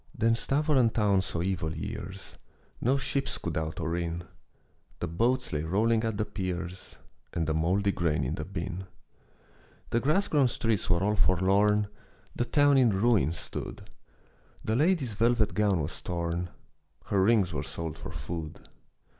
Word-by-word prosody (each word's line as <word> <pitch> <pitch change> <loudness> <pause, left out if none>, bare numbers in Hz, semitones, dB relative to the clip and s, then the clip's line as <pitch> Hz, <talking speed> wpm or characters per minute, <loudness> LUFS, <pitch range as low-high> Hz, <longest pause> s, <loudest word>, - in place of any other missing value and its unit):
Then 115 +1 +3
Stävoren 135 -1 +2
town 100 -4 +3
saw 85 -2 -3
evil 85 -4 -2
years, - - -6 0.5
No 130 +4 +3
ships 140 +1 -1
could 85 - -4
out 80 0 -3
or 85 0 -1
in. 85 0 -3 0.8
The - - -1
boats 120 +7 0
lay 75 - 0
rolling 110 +8 +2
at 110 -2 -1
the 110 - 0
piers, 90 -3 -5 0.4
And 80 - 0
the 80 - 0
mouldy 95 +6 +2
grain 75 -6 0
in 65 +4 -1
the 75 - -3
bin. 95 +1 -5 1.1
The 120 - +3
grass 155 +10 +2
grown 145 -4 +3
streets 115 -3 -1
were 90 +1 +3
all 105 +1 +2
forlorn, 100 +3 +3 0.5
The 120 - 0
town 145 0 +4
in 125 -3 +5
ruin 100 - +3
stood, - - -7 0.7
The 110 - 0
lady's 150 - +2
velvet 115 0 +2
gown 105 -4 +2
was 75 +4 -4
torn, 85 0 -2 0.6
Her 100 - +1
rings 100 -4 +3
were 70 - -1
sold 80 +1 -5
for - - -8
food. 80 -2 -6
95 Hz, 155 wpm, -29 LUFS, 85-115 Hz, 1.1 s, in